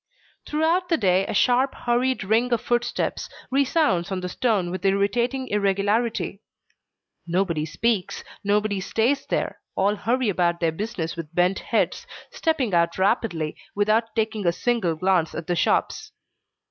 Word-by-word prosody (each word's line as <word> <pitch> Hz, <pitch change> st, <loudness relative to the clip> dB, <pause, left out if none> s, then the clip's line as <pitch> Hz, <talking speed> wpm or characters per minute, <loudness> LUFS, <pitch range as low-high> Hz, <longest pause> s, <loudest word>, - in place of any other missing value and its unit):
Throughout 330 Hz, +4 st, +1 dB
the 330 Hz, -, +3 dB
day 190 Hz, -2 st, +2 dB
a -, -, -3 dB
sharp 255 Hz, +5 st, +3 dB
hurried 245 Hz, 0 st, 0 dB
ring 225 Hz, +5 st, +1 dB
of 235 Hz, -, +2 dB
footsteps 240 Hz, +1 st, -1 dB, 0.2 s
resounds 270 Hz, -, +2 dB
on 190 Hz, -1 st, -2 dB
the 180 Hz, -, -4 dB
stone 200 Hz, -6 st, 0 dB
with 185 Hz, 0 st, -5 dB
irritating 235 Hz, +7 st, +1 dB
irregularity. 205 Hz, +2 st, 0 dB, 0.9 s
Nobody 170 Hz, -3 st, 0 dB
speaks, 215 Hz, +3 st, -1 dB, 0.2 s
nobody 205 Hz, -1 st, +1 dB
stays 245 Hz, +8 st, 0 dB
there, -, -, -2 dB, 0.2 s
all 200 Hz, +2 st, +2 dB
hurry 240 Hz, +3 st, 0 dB
about 175 Hz, -3 st, +1 dB
their 165 Hz, -2 st, +1 dB
business 180 Hz, -2 st, -4 dB
with 165 Hz, -1 st, -8 dB
bent 180 Hz, +2 st, +2 dB
heads, -, -, -1 dB, 0.2 s
stepping 290 Hz, -, 0 dB
out 170 Hz, 0 st, +2 dB
rapidly, 190 Hz, -6 st, 0 dB, 0.2 s
without 215 Hz, +3 st, +1 dB
taking 220 Hz, -3 st, -1 dB
a -, -, +5 dB
single 190 Hz, -4 st, 0 dB
glance 180 Hz, -1 st, +1 dB
at 165 Hz, -, -5 dB
the 175 Hz, -, -1 dB
shops. 435 Hz, -, 0 dB
205 Hz, 145 wpm, -24 LUFS, 180-240 Hz, 0.9 s, a